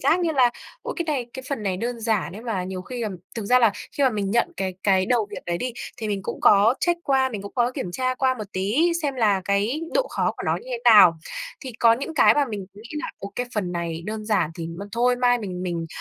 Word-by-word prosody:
giác 350 +3 +3
như 340 - +1
là 255 -4 +4 0.3
ôi, - - -4
cái 340 - -1
này, 275 -6 -1
cái 260 - -7
phần 275 -6 -3
này 190 -3 -1
đơn 235 +4 -3
giản 220 -6 0
ấy 215 +4 -9
mà 205 -7 -2
nhiều 185 0 -5
khi 245 +4 -6
ừm, 205 -4 -3 0.2
thực 225 - -4
ra 250 +5 +5
là 230 -4 +4 0.2
khi 285 - -1
mà 260 - +4
mình 205 -3 -2
nhận 235 +3 +1
cái 190 -1 -2
cái 190 -2 +3
đầu 235 -4 +2
việc 205 - -8
đấy 170 0 -1
đi 250 +4 -3 0.2
thì 220 - -4
mình 200 -2 -1
cũng - - -5
có 210 +4 +6
check 345 -1 +1
qua, 265 -1 +3
mình 210 -5 -6
cũng 200 - -8
có 245 -1 +2
kiểm 180 - -4
tra 255 +2 0
qua 260 0 +1
một 220 - -6
tí 230 - +2
xem 285 -2 -1
là 210 -6 +2
cái 205 +9 0
độ - - +2
khó - - 0
của - - -6
nó - - +2
như 480 - -10
thế - - -2
nào. 185 -7 +8 0.4
Thì 260 -4 -7
có 230 -1 +6
những 275 +7 -3
cái - - +6
mà 290 - +3
mình 210 -7 -6
nghĩ 215 +3 -12
nà - - -4
"Ô, 200 0 -7
cái 245 - -1
phần 185 -5 -1
này 170 -1 -3
đơn 215 0 -4
giản 210 -7 +1
thì 165 -1 -5
m 165 0 -8
thôi 245 +2 +2
mai 245 0 +3
mình 185 -5 -5
mình 170 -2 -3
220 Hz, 275 wpm, -24 LUFS, 195-255 Hz, 0.4 s, nào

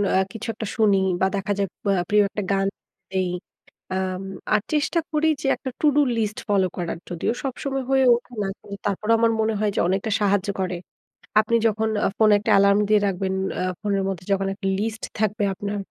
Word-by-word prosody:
আ - - +5
কিছু 225 +1 -7
একটা 220 0 -5
শুনি 210 -3 +4 0.2
বা - - +5
দেখা 200 +1 -2
যায় 195 - +1 0.2
প - - -29 0.2
প্রিয় 210 0 +5
একটা 205 - -4
গান 195 0 +2 0.4
দেই। 185 -1 0 0.6
আম 185 0 -2 0.3
আর 210 - +4
চেষ্টা 300 +3 +1
করি 310 +1 +2
যে 270 - -1
একটা 260 - -6
টু 305 - +4
ডু 295 - +6 0.2
লিস্ট 215 -1 -1
ফলো 195 -2 +3
করার 170 -2 -3
যদিও 175 +6 -1
সবসময় 270 0 -3
হয়ে 265 0 +4
ওঠে 245 +1 -8
না। - - -1 0.4
তারপরেও 210 +3 +2
আমার 230 0 +4
মনে 220 0 +1
হয় 210 -1 +2
যে - - +1
অনেকটা 195 +4 0
সাহায্য 200 -1 +2
করে। 185 -1 -1 0.6
আপনি 220 +2 +2
যখন 220 +1 0 0.2
আ - - +4
ফোনে 215 -1 +5
একটা 210 - -1
এলার্ম 200 +1 +5
দিয়ে 210 -1 +5
রাখবেন, 190 0 -1 0.3
আ - - 0 0.2
ফোনের 200 -2 0
মধ্যে 180 -2 -5
যখন 195 0 0
একটা 195 -1 -4
লিস্ট 225 +1 -3 0.2
থাকবে 215 0 0
আপনার 205 +1 -4
205 Hz, 195 wpm, -23 LUFS, 195-225 Hz, 0.6 s, ডু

